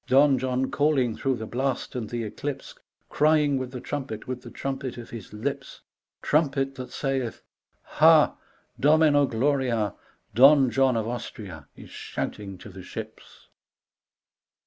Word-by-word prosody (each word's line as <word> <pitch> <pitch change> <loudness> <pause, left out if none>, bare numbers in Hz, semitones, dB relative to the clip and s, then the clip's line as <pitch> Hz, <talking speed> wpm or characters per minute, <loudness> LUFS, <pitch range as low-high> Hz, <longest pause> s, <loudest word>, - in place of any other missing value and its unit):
Don 135 0 +5
John 130 +1 -1
calling 140 -6 +2
through 135 -1 0
the 110 -2 -6
blast 130 +3 -2
and 115 -4 -4
the 120 0 -3
eclipse,. 135 +6 -5 0.3
Crying 150 -2 +3
with 130 -1 -4
the 125 -1 -7
trumpet, 130 -6 -5
with 130 -1 -4
the - - -10
trumpet 135 -2 -5
of 120 - -9
his 110 -4 -9
lips,. 135 +6 -5 0.4
Trumpet 135 -3 +1
that 130 -1 -8
sayeth 135 -4 -3 0.4
ha - - +5
1 - - -24 0.4
Domino 150 -1 +4
gloria 130 0 +1
I 105 -2 0 0.4
Don 135 +2 +6
John 130 -2 +3
of 110 -1 -1
Austria 100 -9 -7
Is - - -13
shouting 100 -2 -5
to 105 - -11
the 95 -1 -10
ships. - - -10
130 Hz, 145 wpm, -26 LUFS, 115-140 Hz, 0.4 s, Don